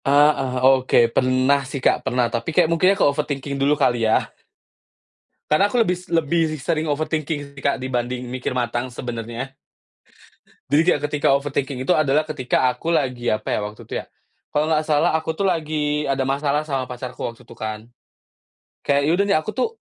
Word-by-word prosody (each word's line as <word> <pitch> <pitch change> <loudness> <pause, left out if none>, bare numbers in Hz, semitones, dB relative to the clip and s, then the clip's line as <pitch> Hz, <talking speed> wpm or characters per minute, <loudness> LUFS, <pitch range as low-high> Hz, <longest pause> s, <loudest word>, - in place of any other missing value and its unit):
Ah, 145 +2 +5
eh, 130 -1 -3 0.3
oke 130 - +1 0.2
pernah 130 +2 +3
sih 135 0 -6
Kak - - +3
pernah 125 +1 +1
tapi 115 +4 -2
kayak 170 +1 +4
mungkin 170 +3 +4
ya 195 - +3
ke - - +3
overthinking 145 -1 -1
dulu 145 +2 +3
kali 120 -3 +2
ya? - - +1 1.2
Karena 155 +6 +4
aku 245 - -1
lebih 180 -5 +1
lebih 165 0 +2 0.2
sering 155 +4 -1
overthinking 145 -1 -3
sih 135 - -10
Kak 140 - +1
dibanding 125 -1 -3
mikir 125 0 -3
matang 120 0 -2
sebenarnya. 120 +2 -6 1.1
Jadi 145 +3 +4
kayak 175 -5 +2
ketika 145 -1 0
overthinking 140 -1 -2
itu 130 - +2
adalah 150 0 +3
ketika 130 -3 +1
aku 165 +6 -2
lagi 125 -5 0
apa 110 - -2
ya - - 0
waktu 105 +1 -8
itu - - -8
ya? - - -22 0.5
Kalau 150 +1 +1
nggak 155 -1 +2
salah 150 0 +2
aku 160 0 -1
tuh 195 +5 -1
lagi 150 -3 -1
ada 135 -1 0
masalah 140 +2 0
sama 135 -3 -1
pacarku 125 0 -7
waktu 120 +1 -6
itu - - -13
kan, 110 0 -6 1.0
kayak 140 0 +2
ya - - +2
udah 200 +3 +2
nih 200 - +3
aku 185 +7 -5
tuh 255 - +1
140 Hz, 185 wpm, -22 LUFS, 125-155 Hz, 1.2 s, Ah